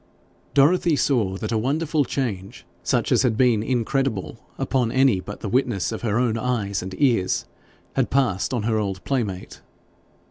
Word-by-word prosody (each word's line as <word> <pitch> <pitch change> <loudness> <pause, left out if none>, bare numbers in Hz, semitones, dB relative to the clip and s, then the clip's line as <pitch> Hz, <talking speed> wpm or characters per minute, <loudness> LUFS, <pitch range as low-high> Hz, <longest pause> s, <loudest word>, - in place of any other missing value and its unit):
Dorothy 160 +3 +4
saw 110 -10 +1
that 110 +3 -4
a 110 - +1
wonderful 150 +4 0
change, 105 -8 -4 0.2
such - - 0
as - - +4
had 120 -4 +1
been 120 -4 +3
incredible 120 -2 -1 0.2
upon 125 -4 0
any 130 -7 +3
but 105 +3 -8
the - - -4
witness 120 -3 0
of 110 - -5
her 110 -2 0
own 120 -2 +1
eyes 110 -6 -1
and 95 +1 -6
ears, 115 -10 +2 0.5
had - - 0
passed 120 -8 +1
on 120 -4 -1
her 110 0 +1
old 95 -3 -3
playmate. 105 -9 -3
115 Hz, 165 wpm, -23 LUFS, 100-135 Hz, 0.5 s, Dorothy